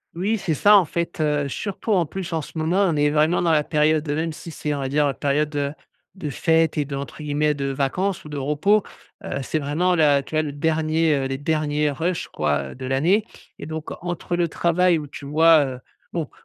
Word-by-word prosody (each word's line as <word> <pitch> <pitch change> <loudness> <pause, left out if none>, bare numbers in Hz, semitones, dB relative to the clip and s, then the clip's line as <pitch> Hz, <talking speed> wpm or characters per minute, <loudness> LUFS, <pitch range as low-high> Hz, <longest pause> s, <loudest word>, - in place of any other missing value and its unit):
Oui 205 +6 0
c'est 175 -5 -1
ça 205 +7 +6
en 190 - +4
fait, 170 +2 -3
heu, 150 -2 +1
surtout 200 - -4
en 180 -4 +3
plus 180 +2 -6
en 160 -2 -1
ce - - -11
moment 170 +3 +1
on - - -2
est 145 0 +3
vraiment 155 +3 +2
dans 170 -2 +2
la 150 -1 +3
période, 155 0 +1
heu 145 - 0
même 160 +1 -1
si 165 +2 -9
c'est 150 - -4
on - - -4
va 135 - -2
dire, 145 +2 +2
heu, 140 - 0
période, 145 +3 0
heu, 140 -1 -1 0.4
de 160 -6 -5
fêtes 160 +2 +1
et 150 - +1
de 140 0 -5
entre 140 +2 -7
guillemets 150 +1 +1
«de 140 -1 -3
vacances 180 +8 -1
ou 150 - -10
de 145 - -5
repos». 150 +10 +2 0.4
Heu, - - -4
c'est 135 - -2
vraiment 155 +5 +1
la 145 -3 +4
tu 140 - -8
vois 155 - +2
le 150 - -4
dernier, 155 +1 +1
heu, 135 - -1
les 135 0 -3
derniers 150 0 0
rush 165 +5 -2
quoi, 75 -3 -1
heu, - - -15
de 130 - -7
l'année 165 +12 +2 0.3
et - - -8
donc 160 0 -6
entre 175 0 -3
le 175 -1 +1
travail 170 +1 +2
où 150 - -7
tu 140 - -10
vois, 155 +1 +5
heu 130 -1 -6 0.3
bon, 165 -5 -2
155 Hz, 235 wpm, -23 LUFS, 145-170 Hz, 0.4 s, ça